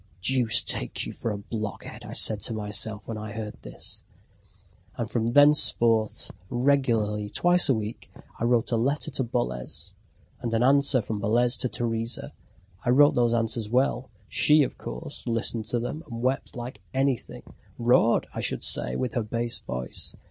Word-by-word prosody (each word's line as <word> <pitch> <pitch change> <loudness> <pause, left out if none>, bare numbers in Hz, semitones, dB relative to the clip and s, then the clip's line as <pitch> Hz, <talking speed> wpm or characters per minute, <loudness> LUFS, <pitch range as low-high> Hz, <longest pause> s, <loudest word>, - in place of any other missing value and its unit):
"Deuce 125 -2 +4
take - - -1
you - - -6
for - - -4
a 105 - -3
blockhead!" 105 +1 -6 0.2
said 110 -2 +3
I - - 0
to 115 - 0
myself 105 0 +1
when 115 -2 -5
I 105 0 -7
heard 110 -1 -7
this. - - -4 0.9
And 115 - -2
from 115 +1 -1
thenceforth, 120 -6 +4 0.2
regularly, 120 -6 +1
twice 175 +5 +3
a 135 - +4
week, 110 +1 -6 0.3
I 115 - 0
wrote 120 -1 +1
a 115 - +2
letter 140 +6 -1
to 130 - -1
Boles, 95 - -4 0.5
and 120 -3 -3
an 115 - +2
answer 135 -2 +4
from 105 0 -4
Boles 120 +4 +2
to 125 - -2
Teresa. 115 0 -3 0.5
I 120 - -1
wrote 145 +4 +6
those 120 -1 +2
answers 115 -1 -1
well... 125 +1 0 0.2
She, 150 0 +5
of - - -4
course, 60 - -8
listened 115 -1 -1
to 120 - -1
them, 125 +6 -4
and 115 0 -6
wept 130 +1 -1
like 120 -3 -7
anything, 135 -2 -1 0.3
roared, 120 -1 +3
I - - -5
should - - -2
say, 60 -1 +2
with 125 -3 -2
her 120 - 0
bass 115 +2 -2
voice. 60 0 -5
115 Hz, 170 wpm, -26 LUFS, 110-125 Hz, 0.9 s, wrote